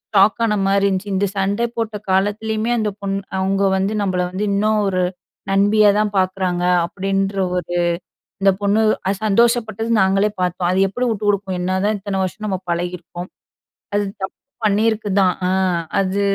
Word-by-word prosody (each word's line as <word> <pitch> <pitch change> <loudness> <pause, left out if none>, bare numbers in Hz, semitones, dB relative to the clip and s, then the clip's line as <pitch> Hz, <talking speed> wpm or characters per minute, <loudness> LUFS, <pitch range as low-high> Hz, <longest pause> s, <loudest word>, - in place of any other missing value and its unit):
Shock 200 +4 +5
ஆனமாரி 200 -2 +2
இருந்துச்சு. 195 +1 -2
இந்த 195 +2 +2
சண்டை 200 +4 +1
போட்ட 225 -2 -2 0.2
காலத்திலயுமே 215 +4 0
அந்த 210 -1 0
பொண்ணு 195 0 -2 0.2
அவுங்க 195 +1 +1
வந்து 195 +3 0
நம்மள 185 -2 0
வந்து 200 +3 -2
இன்னும் 215 +1 +2
ஒரு 185 -1 +1 0.5
நண்பியா 205 +2 +4
தான் 210 -1 0
பார்க்குறாங்க. 185 -1 0 0.2
அப்பிடின்ற 195 +2 -2 0.2
ஒரு 175 0 -3 0.7
இந்த 195 - +5
பொண்ணு 205 +2 +2 0.2
அத 195 - +2
சந்தோஷப்பட்டது. 225 0 +2
நாங்களே 195 +2 +3
பார்த்தோம். 180 0 0
"அது 185 - +1
எப்பிடி 245 +6 -2
வுட்டு 210 -1 -2
குடுக்கும்! 195 -2 -1
என்னதான் 190 +3 0
இத்தனை 195 -1 -3
வருஷம் 215 +3 -4
நம்ம 190 -2 -2
பழகியிருக்கோம். 175 +1 -4 0.7
அது 205 0 +2 0.2
தப்பு 190 - -3 0.3
பண்ணியிருக்கு 215 +1 +1
தான். 185 -2 +3
ஆ - - +1 0.5
அது 195 +1 0
195 Hz, 150 wpm, -20 LUFS, 190-210 Hz, 0.7 s, Shock